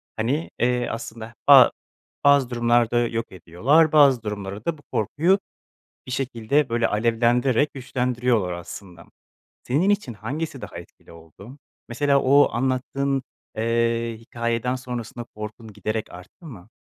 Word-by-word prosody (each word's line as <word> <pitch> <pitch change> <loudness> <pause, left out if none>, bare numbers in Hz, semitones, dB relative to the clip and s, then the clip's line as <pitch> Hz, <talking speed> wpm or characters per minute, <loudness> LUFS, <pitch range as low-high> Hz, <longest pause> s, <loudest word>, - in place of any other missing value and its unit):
hani, 135 +9 -1
eee, 125 0 +1
aslında, 115 0 -7
ba 135 -4 +9 0.5
bazı 140 -3 +5
durumlarda 120 -1 +2
yok 115 0 -4
ediyorlar, 120 - +2
bazı 140 -6 +5
durumlara 100 0 -6
da 165 -2 -1
bu - - -18
korkuyu 165 - +1 0.7
bir - - -7
şekilde, 130 +2 0
böyle, 115 0 +1
alevlendirerek 120 +5 +1
güçlendiriyorlar 125 -6 -1
aslında. 85 0 -10 0.6
Senin 150 +10 +1
için 205 - 0
hangisi 135 +7 -5
daha - - -8
etkili 85 - -14
oldu? 85 - -14 0.3
Mesela 140 +3 +2
o 140 +2 +5
anlattığın, 135 +2 -1 0.3
eee, 115 0 0
hikâyeden 115 +1 -2
sonrasında 125 -2 -6
korkun 105 +1 -8
giderek 110 +2 -4
arttı 90 - -14
mı? 110 - -11
120 Hz, 125 wpm, -23 LUFS, 110-135 Hz, 0.7 s, ba